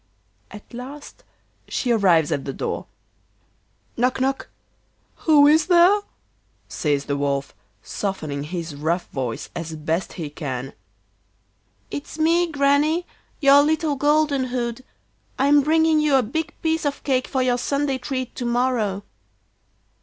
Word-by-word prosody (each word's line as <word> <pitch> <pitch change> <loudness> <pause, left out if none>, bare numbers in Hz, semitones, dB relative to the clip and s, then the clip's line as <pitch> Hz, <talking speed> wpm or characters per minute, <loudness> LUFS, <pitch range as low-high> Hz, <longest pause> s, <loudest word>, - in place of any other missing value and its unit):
At 210 +4 -13
last 280 - -9 0.4
she 245 - -1
arrives 180 -9 +3
at 140 - -1
the 135 - -5
door. - - -4 1.1
Knock, 250 +2 +1
knock. 270 +1 -1 0.8
'Who 295 -2 +7
is 310 +2 +4
there?' 360 +3 +5 0.7
says 145 -2 -1
the 140 - -1
Wolf, 140 -1 -2 0.3
softening 155 -8 -4
his 165 -1 -5
rough 160 +5 -1
voice 125 -4 -4
as 165 -1 -5
best 160 +4 -2
he 160 -5 -6
can. 135 -3 -5 1.2
'It's 290 +2 -6
me, 335 +2 +2
Granny, 290 +4 +2 0.4
your 280 0 +7
little 310 0 +1
Golden 290 -1 +2
hood. 245 -1 -3 0.5
I'm 285 +2 +4
bringing 320 +1 +3
you 300 -2 +3
a 260 - +4
big 320 +9 -3
piece 320 0 0
of 285 -1 -2
cake 260 -2 0
for 260 -2 0
your 245 -1 +1
Sunday 280 0 -1
treat 255 -1 -4
to 245 - -3
morrow. 235 -5 0
255 Hz, 130 wpm, -22 LUFS, -, 1.2 s, Who